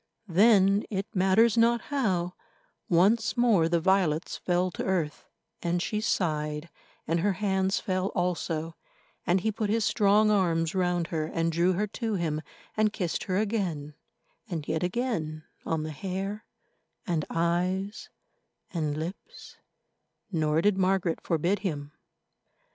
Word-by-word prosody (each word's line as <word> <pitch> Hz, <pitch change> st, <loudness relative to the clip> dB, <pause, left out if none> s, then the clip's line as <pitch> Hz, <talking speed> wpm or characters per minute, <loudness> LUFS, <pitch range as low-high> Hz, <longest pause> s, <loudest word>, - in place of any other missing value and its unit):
Then, 200 Hz, +1 st, +5 dB
it 195 Hz, -2 st, -2 dB
matters 200 Hz, +5 st, +4 dB
not 235 Hz, +1 st, +4 dB
how, 185 Hz, -10 st, 0 dB, 0.6 s
once 210 Hz, +8 st, +3 dB
more 215 Hz, -9 st, +4 dB
the 170 Hz, 0 st, +2 dB
violets 175 Hz, -3 st, +1 dB
fell 180 Hz, +1 st, 0 dB
to -, -, -4 dB
earth, 170 Hz, -6 st, -2 dB, 0.3 s
and 175 Hz, 0 st, 0 dB
she 210 Hz, +4 st, -2 dB
sighed, 150 Hz, -6 st, -1 dB, 0.4 s
and 165 Hz, +2 st, +1 dB
her 200 Hz, +3 st, +2 dB
hands 190 Hz, 0 st, 0 dB
fell 185 Hz, 0 st, -1 dB
also, 165 Hz, -2 st, -1 dB, 0.5 s
and 180 Hz, +2 st, +3 dB
he 220 Hz, +3 st, 0 dB
put 215 Hz, -1 st, -2 dB
his 220 Hz, 0 st, +1 dB
strong 210 Hz, 0 st, +4 dB
arms 165 Hz, -5 st, +1 dB
round 180 Hz, -2 st, 0 dB
her 155 Hz, -2 st, -1 dB
and 165 Hz, 0 st, -1 dB
drew 170 Hz, +3 st, +2 dB
her 205 Hz, +4 st, 0 dB
to 220 Hz, +1 st, -3 dB
him 155 Hz, -4 st, -1 dB, 0.3 s
and 215 Hz, -1 st, +2 dB
kissed 180 Hz, -6 st, -2 dB
her 185 Hz, -1 st, 0 dB
again 190 Hz, -9 st, -1 dB, 0.6 s
and 160 Hz, -5 st, -4 dB
yet 160 Hz, 0 st, -1 dB
again 175 Hz, -7 st, -2 dB, 0.2 s
on 160 Hz, -1 st, 0 dB
the 155 Hz, -, -4 dB
hair 195 Hz, +6 st, -4 dB, 0.6 s
and 165 Hz, -4 st, 0 dB
eyes 180 Hz, +4 st, -1 dB, 0.6 s
and 155 Hz, -4 st, -1 dB
lips; 185 Hz, -, -8 dB, 0.7 s
nor 155 Hz, -2 st, +1 dB
did 205 Hz, -2 st, +3 dB
Margaret 185 Hz, -3 st, +1 dB
forbid 175 Hz, +4 st, 0 dB
him. 150 Hz, -7 st, -4 dB
185 Hz, 135 wpm, -28 LUFS, 165-205 Hz, 0.7 s, Then